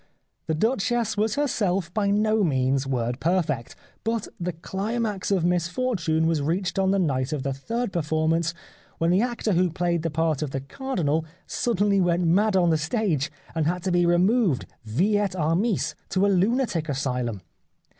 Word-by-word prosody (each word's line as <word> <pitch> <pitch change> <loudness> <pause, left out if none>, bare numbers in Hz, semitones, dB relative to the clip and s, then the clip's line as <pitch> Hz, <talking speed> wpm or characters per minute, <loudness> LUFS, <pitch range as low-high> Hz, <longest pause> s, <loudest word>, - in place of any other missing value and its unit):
The 160 - 0
Duchess 230 +3 0
was 215 +1 0
her 290 0 +1
self 185 -7 -1
by 205 -2 +1
no 215 +1 +2
means 135 -3 +1
word 125 -1 -1
perfect. 155 -8 0 0.3
But 225 -1 -1
the 180 0 -2
climax 205 +4 -3
of 190 -4 +2
misfortune 180 -1 0
was 160 -2 +1
reached 170 +4 -1
on 190 0 +2
the 195 - +3
night 140 -7 0
of 150 -4 -2
the 135 - -1
third 230 - -3
performance 160 0 0 0.4
when 165 +1 +2
the 185 +3 +4
actor 240 -3 -1
who 180 +1 +3
played 170 0 0
the 165 - -1
part 160 -1 0
of 150 - -2
the 135 0 -3
Cardinal 160 - -1 0.2
suddenly 205 -4 +1
went 175 0 +2
mad 195 +5 +3
on 175 -3 +4
the 160 - +2
stage 160 - 0 0.2
and 160 -2 0
had 175 +1 -1
to 190 - 0
be 175 0 +3
removed 180 - +3 0.2
vi 180 - +1
et 200 -3 -1
armis 175 +6 +1 0.2
to 190 +1 +2
a - - +3
lunatic 195 - +1
asylum. 125 -6 -2
175 Hz, 175 wpm, -25 LUFS, 155-205 Hz, 0.4 s, the